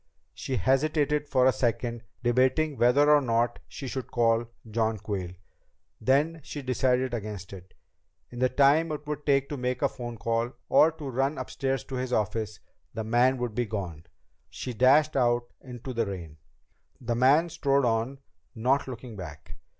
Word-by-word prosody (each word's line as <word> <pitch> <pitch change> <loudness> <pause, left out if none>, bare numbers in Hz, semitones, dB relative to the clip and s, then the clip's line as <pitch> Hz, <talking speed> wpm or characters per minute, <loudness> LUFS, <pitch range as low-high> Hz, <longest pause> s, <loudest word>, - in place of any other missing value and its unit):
She 130 - -4
hesitated 145 - +1
for 130 -3 +3
a 130 - +6
second, 120 -1 -1 0.2
debating 130 +5 +2
whether 130 +4 +4
or 150 - +5
not 120 -1 0
she 135 - -7
should 130 0 -5
call 115 -1 +2 0.2
John 110 0 0
Quayle. 95 -3 -5 0.6
Then 145 +7 +2
she 145 0 -7
decided 130 0 +1
against 105 -4 -5
it. 95 -1 -12 0.6
In 120 - -8
the 130 0 +3
time 145 +5 +4
it 150 -1 -5
would 150 0 -5
take 140 -1 +3
to 145 - -4
make 125 +1 -2
a - - +5
phone 120 -3 -7
call 115 +3 -1 0.2
or 160 - +6
to 155 -3 -8
run 135 +3 0
upstairs 135 -1 -2
to 135 -1 -6
his 130 0 -3
office, 110 -1 -1 0.4
the 110 - -2
man 120 +4 +3
would 120 -3 -3
be 120 +1 -1
gone. 90 -6 -5 0.4
She 125 - -6
dashed 140 +7 +4
out 120 -2 +2 0.2
into 125 0 -7
the 115 -2 0
rain. 85 -6 -7 0.6
The 120 - -2
man 140 +8 +4
strode 140 -4 +1
on, 115 +3 0 0.4
not 130 +5 +1
looking 120 -2 -8
back. 85 -7 -9
125 Hz, 165 wpm, -27 LUFS, 115-135 Hz, 0.6 s, a